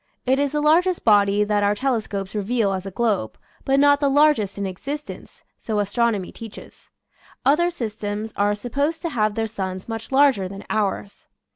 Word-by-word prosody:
It 265 +1 +2
is 285 0 0
the 300 - 0
largest 340 +4 +2
body 205 -1 +4
that 205 0 +1
our 205 0 +2
telescopes 210 -6 -2
reveal 210 0 0
as 190 0 -4
a - - -3
globe, 200 - -1 0.3
but 270 0 +3
not 285 0 +5
the 285 -1 +2
largest 280 -9 +3
in 200 - -2
existence, 275 +11 -7 0.2
so 220 -2 -3
as 205 -1 -1
tronomy 230 -6 0
teaches. 225 -2 -11 0.6
Other 330 +5 +4
systems 215 -6 -5
are 205 +1 +1
supposed 280 - -2
to 335 - -1
have 215 -7 0
their 225 - 0
suns 190 -4 -5
much 225 +1 -6
larger 265 -8 +4
than 195 +1 -9
ours. 205 -1 -2
220 Hz, 175 wpm, -22 LUFS, 205-275 Hz, 0.6 s, not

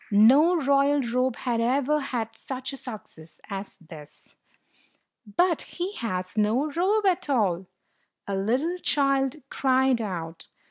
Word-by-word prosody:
No 265 - +6
royal 280 -1 +3
robe 250 +1 0
had 240 -3 -1
ever 275 +5 +1
had 240 -5 -4
such 260 +3 -6
a - - -4
success 215 -11 -10
as 195 0 -6
this. 155 -3 -14 1.0
"But 350 -2 +3
he 365 +3 -5
has 185 -5 -4
no 225 +8 +1
robe 395 +7 +1
at 360 -5 +1
all!" 195 -9 +1 0.6
a 200 - -2
little 255 - 0
child 275 -5 +1 0.2
cried 260 -2 +2
out. 170 -5 -6
255 Hz, 130 wpm, -26 LUFS, 210-285 Hz, 1.0 s, No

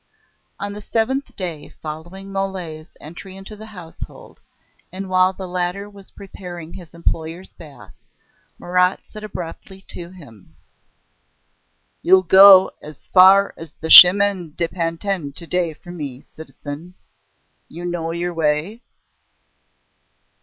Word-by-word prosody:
On 200 0 -5
the 210 - -8
seventh 250 +5 -2
day 170 -6 -6
following 175 +6 -9
Mole's 185 -5 -5
entry 185 +5 -11
into 195 +2 -11
the 215 +1 -11
household, 180 -6 -12 0.5
and 190 +2 -7
while 185 0 +4
the 190 0 -8
latter 180 +2 -3
was 200 -2 -15
preparing 175 -4 -10
his 170 -3 -12
employer's 170 +2 -4
bath, 150 -4 -15 0.6
Marat 180 +1 +1
said 215 - -11
abruptly 190 -1 -8
to 170 -1 -7
him: 140 - -16 1.5
"You'll 185 +1 +5
go 190 +1 +8
as 150 -1 -13
far 195 +2 +6
as 165 -2 -11
the 160 - -6
Chemin 185 -3 +8
de 170 -1 -1
Pantin 165 -2 -1
to 170 - -10
day 175 -1 -1
for 175 - -13
me, 140 -7 -8
citizen. 160 +2 -10 0.7
You 175 +2 -8
know 175 -2 -3
your 175 +1 -3
way?" 165 +7 -1
180 Hz, 125 wpm, -20 LUFS, 165-195 Hz, 1.5 s, go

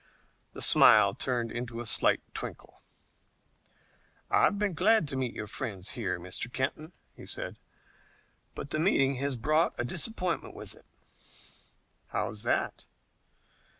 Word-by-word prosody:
The - - 0
smile - - +7
turned 120 -3 -2
into 120 -1 -5
a 120 - -5
slight 110 - +3
twinkle. - - -8 1.5
"I've 205 - +4
been 205 -2 0
glad 200 +1 +3
to 135 - -4
meet 130 -2 -2
your 110 - -4
friends 105 -4 -5
here, 100 -7 -3
Mr. 90 +7 -5
Kenton," 155 +6 -3 0.2
he - - -12
said, - - -6 1.0
"but 140 - -7
the 155 - -1
meeting 140 -6 +2
has 140 +1 -1
brought 155 +8 +1
a 120 - 0
disappointment 180 - -2
with - - -8
it." - - -20 1.2
"How's 105 - -3
that?" 120 - -1
130 Hz, 130 wpm, -29 LUFS, 115-155 Hz, 1.5 s, smile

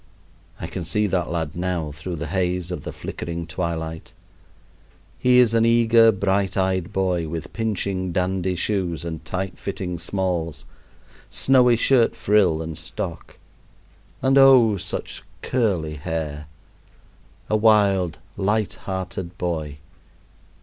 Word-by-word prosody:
I - - -5
can 90 - -5
see 105 +6 +1
that 90 -4 -1
lad 80 -2 -3
now 85 -3 -2
through 75 +5 -6
the 80 +1 -5
haze 90 +1 -1
of 85 -6 -5
the - - -4
flickering 85 0 -6
twilight. 80 -1 -4 1.1
He 125 0 +4
is 120 -3 +5
an 115 0 +4
eager 115 -1 +5
bright 95 0 0
eyed 95 0 0
boy, 90 -4 0
with 80 0 -6
pinching, 100 -4 -2
dandy 90 +1 -1
shoes 90 -3 -2
and 80 -1 -5
tight 95 +3 -4
fitting 90 -3 -4
smalls, 90 -3 -2 0.6
snowy 125 -2 +4
shirt 120 0 +3
frill 100 -7 +2
and 80 -1 -6
stock, - - -6 0.9
and 135 +1 +5
oh! 130 -6 +7
such 95 -1 -5 0.2
curly 90 -11 0
hair. 75 -1 -4 1.0
A 110 - +1
wild, 100 -5 +3 0.2
light 105 +1 0
hearted 95 -2 -5
boy! 80 -5 -3
95 Hz, 125 wpm, -23 LUFS, 85-105 Hz, 1.1 s, oh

